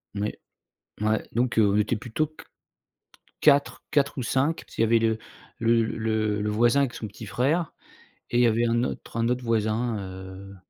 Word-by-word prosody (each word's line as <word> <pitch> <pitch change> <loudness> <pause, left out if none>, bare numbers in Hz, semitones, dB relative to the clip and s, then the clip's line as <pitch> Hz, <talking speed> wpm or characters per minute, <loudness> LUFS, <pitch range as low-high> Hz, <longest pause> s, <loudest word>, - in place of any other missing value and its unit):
Oui, 105 +1 -1 0.7
ouais, 110 0 +1
donc 120 +1 +1
on 100 -1 +4
était 105 +3 +1
plutôt 120 +7 -2
qu 155 - -15 1.0
4-4 145 0 +2
ou 130 - -2
5, 135 +7 +1
parce - - -16
qu'il - - -1
y - - +5
avait 115 +1 +4
le 110 -1 +1 0.4
le 115 0 +3
le 110 -2 -1
le 105 - -1
voisin 120 +6 +3
avec 130 -3 0
son 110 - -5
petit 105 +2 -10
frère, 145 +10 0 0.6
et 120 - 0
il 125 - +5
y - - +6
avait 115 +1 +2
un 120 +1 +2
autre 120 - -5
un 115 0 +1
autre 125 0 -1
voisin, 115 0 0
heu 95 +1 -9
115 Hz, 185 wpm, -26 LUFS, 105-125 Hz, 1.0 s, y